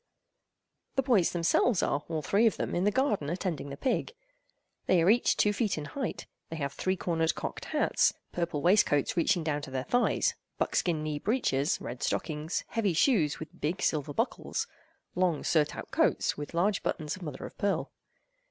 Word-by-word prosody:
The 270 - +2
boys 230 -10 +3
themselves 175 +5 +2
are, 145 - 0
all 160 -2 -2
three 210 +9 +3
of 220 - 0
them, - - -2
in 180 - +1
the - - +5
garden 210 - +1
attending 170 -5 -3
the 140 - -7
pig. 260 - -1 0.7
They 185 - +4
are 185 - +6
each 240 +2 +3
two 210 - +3
feet 210 -4 0
in 150 - -4
height. 265 - -4 0.2
They 165 - -5
have 140 -3 -3
three 185 0 0
cornered 165 -2 0
cocked - - -5
hats, - - +2 0.2
purple 170 -4 -2
waistcoats 175 -6 +3
reaching 170 0 +2
down 150 -2 -1
to 145 - -7
their 130 -1 -2
thighs, 245 - +2 0.2
buckskin 165 -4 0
knee 150 -1 -2
breeches, 175 - +1
red 120 +1 -7
stockings, 155 +1 -2
heavy 210 -6 0
shoes 165 - +2
with 160 - -10
big 165 +6 -1
silver 145 -2 0
buckles, 255 - -2 0.5
long 180 -4 +1
surtout 155 -3 0
coats - - +2
with 145 +3 -7
large 195 +4 +2
buttons 150 -2 -2
of 185 - -13
mother 150 -6 -6
of - - -10
pearl. 200 -1 0
170 Hz, 180 wpm, -29 LUFS, 150-205 Hz, 0.7 s, are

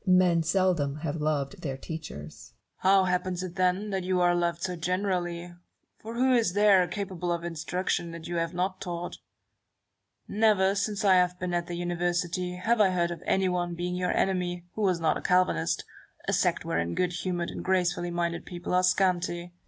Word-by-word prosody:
Barrow. 185 -2 +5
Men 175 -2 +4
seldom 170 -4 +1
have 155 -1 -2
loved 150 0 -1
their 135 -5 -3
teachers. 75 - -8 0.3
Newton. 190 - +4
How 195 0 +6
happens 180 0 -1
it, 180 -2 -5
then, 185 +3 +1
that 190 -1 -1
you 185 0 +1
are 175 0 +4
loved 170 -1 0
so 180 -1 -2
generally; 175 -1 -2 0.5
for 225 +1 -8
who 260 +2 +3
is 230 -7 +2
there, 200 -3 +5
capable 180 -1 -3
of 170 -1 -2
instruction, 170 +1 -2
that 165 -1 -8
you 175 0 -3
have 165 -1 0
not 185 +2 -2
taught? 175 -1 -5 1.1
Never, 205 -2 +3
since 205 +1 -1
I 195 - +6
have 180 0 +2
been 180 -1 -3
at 175 -1 -1
the 175 0 -4
Univer 175 0 -1
sity, 180 0 -2
have 225 +3 +2
I 200 - +5
heard 175 -2 0
of 170 - -6
anyone 180 -2 +1
being 175 +1 -3
your 180 0 0
enemy 180 -2 0
who 220 - -4
was 185 -4 +2
not 160 -2 +2
a - - -7
Calvinist 180 - +1 0.2
— - - -25
a - - +1
sect - - +1
wherein 85 +1 -1
good 180 -1 0
humoured 175 0 -2
and - - -6
grace 185 -2 +2
fully 175 0 -4
minded 170 -1 -2
men 175 0 -4
are 180 - +4
scanty. 175 -2 +1
180 Hz, 200 wpm, -28 LUFS, 170-185 Hz, 1.1 s, How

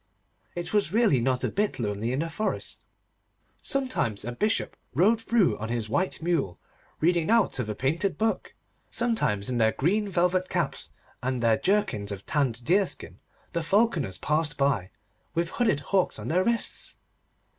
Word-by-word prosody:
It 175 +1 -4
was 205 -7 +2
really 210 - +3
not 130 +1 0
a - - +2
bit 210 +1 0
lonely 110 -1 -2
in 130 +3 0
the 165 - -2
forest. 215 +6 -2 0.8
Sometimes 255 - -1
a 120 - -3
Bishop 210 - 0 0.2
rode 215 - +4
through 205 - +2
on 110 +1 -4
his 115 -2 -2
white 185 - -1
mule, 155 - 0 0.4
reading 170 +1 +2
out 230 - +3
of 115 -4 -2
a 105 - -2
painted 165 - 0
book. 220 0 -1 0.3
Sometimes 220 - 0
in 125 -2 -1
their 110 0 +4
green 205 +8 +1
velvet 185 0 +1
caps, - - 0 0.3
and 125 -1 -1
their 115 -1 +5
jerkins 190 - 0
of 100 -1 -6
tanned 130 -5 0
deerskin, 190 +3 0 0.3
the 170 - 0
falconers 170 - +1
passed 150 -1 0
by, 135 -10 +1 0.5
with 170 0 0
hooded 215 - +1
hawks 190 -2 +2
on - - -6
their 180 +4 +3
wrists. 235 +2 -1
165 Hz, 160 wpm, -27 LUFS, 120-205 Hz, 0.8 s, their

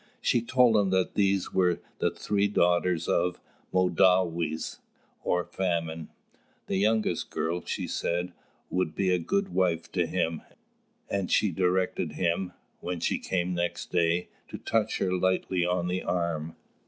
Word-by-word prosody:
She 120 - +2
told 120 -1 +4
him 100 -2 +2
that 95 -1 +1
these 100 -2 +1
were 90 -2 +2 0.2
the - - +2
three 100 -1 0
daughters 90 -3 +2
of 90 +1 +1 0.3
"Mōdāwes," 90 -3 +2 0.4
or 90 0 +1
Famine. 85 -4 -2 0.6
The 95 - -1
youngest 105 -3 +1
girl, 85 +2 -2
she - - -3
said, 90 +1 -2 0.4
would 90 -3 0
be 95 -2 +1
a 90 - +3
good 200 - 0
wife 85 - 0
to 90 -3 +1
him; 80 -2 -1 0.7
and 100 -2 -2
she 105 - +3
directed 90 +1 0
him, 90 +1 -1 0.3
when 90 -1 -4
she - - 0
came 90 -1 -1
next 85 0 -2
day, 85 0 +1 0.2
to - - -7
touch 110 -1 0
her 95 -1 0
lightly 95 0 +1
on 90 -1 0
the 90 +1 -1
arm. 85 -3 -2
90 Hz, 145 wpm, -28 LUFS, 85-95 Hz, 0.7 s, told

